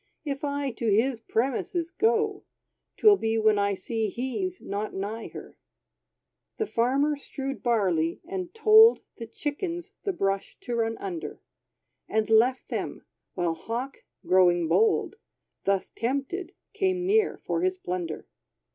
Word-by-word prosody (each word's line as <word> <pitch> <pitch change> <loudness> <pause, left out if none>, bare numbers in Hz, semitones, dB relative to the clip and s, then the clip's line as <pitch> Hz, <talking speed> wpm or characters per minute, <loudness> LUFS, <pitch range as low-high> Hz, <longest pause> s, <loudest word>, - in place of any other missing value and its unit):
If 280 -1 -3
I 285 -1 -1
to 230 0 -2
his 230 +4 +2
premises 275 +10 -1
go. 440 -3 +1 0.5
'Twill 420 -2 +6
be 225 -5 0
when 215 -1 +3
I 200 0 +1
see 220 +3 -2
he's 305 - -3
not 205 +2 -4
nigh 210 +4 -4
her." - - -11 1.0
The 435 - 0
Farmer 275 - +1
strewd 275 -1 -6
barley, 185 -9 +1
and 365 -1 -4
toled 445 +1 +6
The 230 - -7
chickens 335 - -4
the 400 - -1
brush 195 - -2
to 245 - -5
run 225 -1 0
under, 365 -4 -6 0.7
And 220 0 0
left 245 +4 +3
them, - - -4 0.3
while 175 -2 0
Hawk 235 +10 -5 0.3
growing 175 -2 +4
bold, 435 - +2 0.5
Thus 195 -1 0
tempted, 280 +9 -3 0.2
came 370 -2 0
near 420 +2 +2
for - - -2
his 370 0 +1
plunder. 175 - -4
260 Hz, 135 wpm, -27 LUFS, 215-360 Hz, 1.0 s, Twill